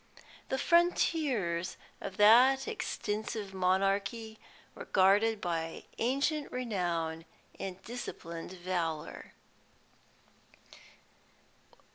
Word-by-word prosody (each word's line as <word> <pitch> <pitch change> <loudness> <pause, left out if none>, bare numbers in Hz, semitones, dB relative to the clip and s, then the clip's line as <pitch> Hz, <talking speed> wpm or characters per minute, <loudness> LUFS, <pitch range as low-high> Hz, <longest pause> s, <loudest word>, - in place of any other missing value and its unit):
The 265 - 0
frontiers 280 - +1 0.2
of 195 0 -6
that 250 - +6
extensive 215 - -3
monarchy 195 +4 0 0.3
were - - -9
guarded 205 +4 +4
by 165 -3 -3 0.2
ancient 280 +5 0
renown 175 -9 -2 0.4
and 190 -1 -5
disciplined 175 -8 -7
valour." 175 -4 -4
200 Hz, 70 wpm, -31 LUFS, 180-245 Hz, 0.4 s, that